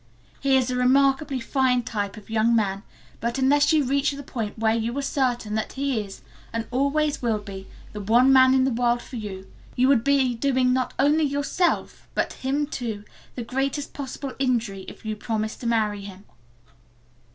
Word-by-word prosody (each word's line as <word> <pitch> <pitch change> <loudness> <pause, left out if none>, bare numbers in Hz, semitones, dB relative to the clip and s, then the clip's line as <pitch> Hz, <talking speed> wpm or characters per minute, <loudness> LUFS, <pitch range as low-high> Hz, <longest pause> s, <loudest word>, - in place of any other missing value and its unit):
"He 270 -1 +3
is 255 -1 0
a - - -1
remarkably 270 +2 +3
fine 250 0 +1
type 205 -3 -3
of 210 - -12
young 225 +1 +2
man, 200 -3 0 0.4
but 235 +2 -2
unless 285 +3 +4
you 310 -2 +4
reach 275 +2 +1
the 285 0 -7
point 225 -6 -5
where 220 0 +2
you 230 +3 -2
are - - 0
certain 245 -6 -1
that 220 0 -2
he 270 -4 -1
is, 195 -1 -12 0.3
and 230 0 -3
always 280 +3 +1
will 230 -3 +1
be, 195 -2 -9 0.3
the 210 - -5
one 240 +6 +5
man 260 0 +6
in 260 - +4
the 265 - +1
world 240 0 +1
for 250 - -8
you, 195 -3 -6 0.3
you 255 +1 +3
would 255 -5 +4
be 275 -2 +3
doing 255 0 +2
not 255 0 -1
only 295 +3 +3
yourself 285 +5 -1
but - - 0
him 275 +3 -1
too, 230 -7 -5 0.3
the 245 - -4
greatest 270 +4 -2
possible 275 -1 -6
injury 230 -7 -1
if - - -11
you 215 0 -2
promised 220 0 -3
to 240 - -3
marry 215 -3 +1
him." 195 -1 -10
250 Hz, 185 wpm, -24 LUFS, 220-275 Hz, 0.4 s, man